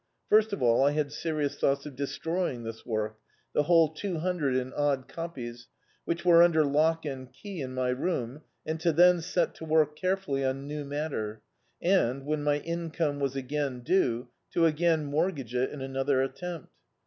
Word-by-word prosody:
First 215 +1 +5
of 200 - -2
all 120 +2 +4
I 145 +1 +3
had 150 -1 -1
serious 150 -2 -2
thoughts 140 0 +1
of 145 -3 -8
destroying 145 -1 -2
this 115 0 -7
work 110 -1 -2 0.2
— - - -41
the - - +3
whole 165 +1 +5
two 185 +1 -3
hundred 160 -6 0
and 130 0 -1
odd 140 -3 0
copies, 120 -8 -7 0.4
which 170 +1 -2
were 170 -1 +7
imder 165 -3 +6
lock 155 +3 +2
and 130 -3 -6
key 175 +6 -8
in 130 -1 -5
my 130 -1 0
room, 130 -1 -2 0.2
and 160 +1 -2
Co 170 0 +3
then 175 +2 +6
set 175 0 0
to - - -11
work 155 -1 +2
carefully 185 -6 -1
on 135 +1 -1
new 150 +1 -4
matter, 140 -7 -4 0.4
and, 140 -8 +2
when 150 0 -1
my 145 0 +1
income 165 -3 -2
was 140 -1 -1
again 135 -1 -2
due, 125 -6 +1 0.2
to 170 - +4
again 160 0 +2
mortgage 145 - -1
it 125 +1 +1
in 145 - -8
another 135 0 +1
attempt. 165 +4 -6
145 Hz, 185 wpm, -29 LUFS, 130-165 Hz, 0.4 s, were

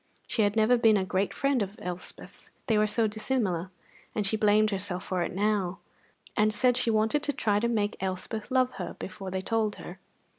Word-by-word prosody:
She 225 - -1
had 205 0 +2
never 225 +3 +4
been 225 -3 +5
a 190 - 0
great 190 +1 0
friend 275 -3 +1
of 200 0 -3
Elspeth's, 180 0 -7 0.2
they 225 - +2
were 215 0 +3
so 225 +2 +2
dissimilar; 210 -5 -1 0.5
and 210 - 0
she 195 - +1
blamed 215 0 +3
herself 190 -2 -2
for 185 -2 -2
it - - -1
now, 195 -1 0 0.6
and 215 +1 +3
said 250 +3 +3
she 245 -1 +1
wanted 220 +6 +2
to 295 - 0
try 205 -4 +1
to 235 - +1
make 210 -3 0
Elspeth 190 +3 -3
love 255 -1 +2
her 180 -2 -5
before 190 0 -7
they 190 0 -2
told 220 +1 0
her. 180 +2 -10
210 Hz, 200 wpm, -28 LUFS, 190-225 Hz, 0.6 s, been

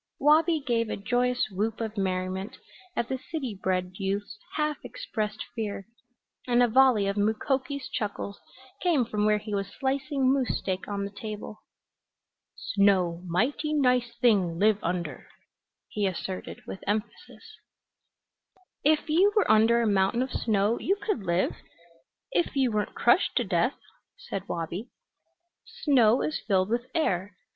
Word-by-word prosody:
Wabi 310 +2 +4
gave 230 -3 +1
a - - -2
joyous 245 +4 +1
whoop 215 +4 -2
of 220 -1 -3
merriment 190 +1 -2 0.4
at 235 - 0
the 260 0 -3
city 265 - -5
bred 185 0 -1
youth's 200 +1 -3 0.2
half 300 -1 0
expressed 215 - -4
fear 210 -4 -4 0.6
and 245 0 +4
a - - +5
volley 245 -3 +5
of 200 +1 -1
Mukoki's 260 +6 0
chuckles 205 -1 -4 0.4
came 320 -9 +3
from 210 -2 0
where 210 0 +4
he 210 0 -6
was 195 -1 -1
slicing 265 +3 0
moose 265 -3 0
steak 185 -1 -3
on 200 -1 -2
the 200 - -6
table. 210 +1 -7 1.0
"Snow 185 -4 +2
mighty 275 - 0
nice 250 -4 +2
thing 195 -8 +3
live 210 +2 +3
under," 170 -5 -3 0.6
he 205 -2 -1
asserted 185 0 -5
with 190 - -8
emphasis. 210 +2 -4 1.3
"If 305 +2 +3
you 355 +7 +4
were 425 - +4
under 225 +2 +5
a - - +1
mountain 200 +4 +2
of 260 - -6
snow 215 +1 +1
you 390 - +1
could 410 - -2
live, 170 +2 +1 0.7
if 175 +9 0
you 265 -3 +2
weren't 210 -1 -2
crushed - - +3
to - - +3
death," - - +1 0.4
said 195 - -6
Wabi. 170 +7 -4 0.9
"Snow 250 -5 +4
is 310 - -2
filled 190 -2 +2
with 240 +1 -1
air. 195 - 0
215 Hz, 145 wpm, -27 LUFS, 195-260 Hz, 1.3 s, a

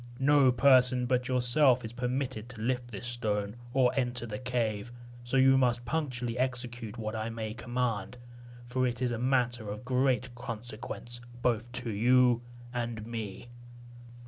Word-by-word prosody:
No 135 -1 +5
person 125 0 +5
but 125 0 +1
yourself 125 0 +3
is 110 - -7
permitted 125 -2 -3
to 120 -3 -11
lift 125 +1 -1
this 105 -1 -7
stone, 105 -4 -1 0.2
or 125 -1 +4
enter 125 -3 -1
the 105 -2 -5
cave; 120 -3 -2 0.3
so 120 +2 0
you 135 0 +6
must 120 -2 +1
punctually 125 -6 -2
execute 125 -3 -3
what 110 -1 -4
I 110 +1 -2
may 110 -1 -4
command, 120 -1 -2 0.5
for 130 +1 0
it 120 -1 -3
is 125 -1 0
a 115 - -2
matter 120 -3 +1
of 105 +4 -6
great 130 -1 +1
consequence 120 0 -7 0.2
both 120 -1 0
to 120 -1 -3
you 120 +3 +4 0.3
and 120 -3 -3
me." 115 0 -6
120 Hz, 150 wpm, -30 LUFS, 115-125 Hz, 0.5 s, you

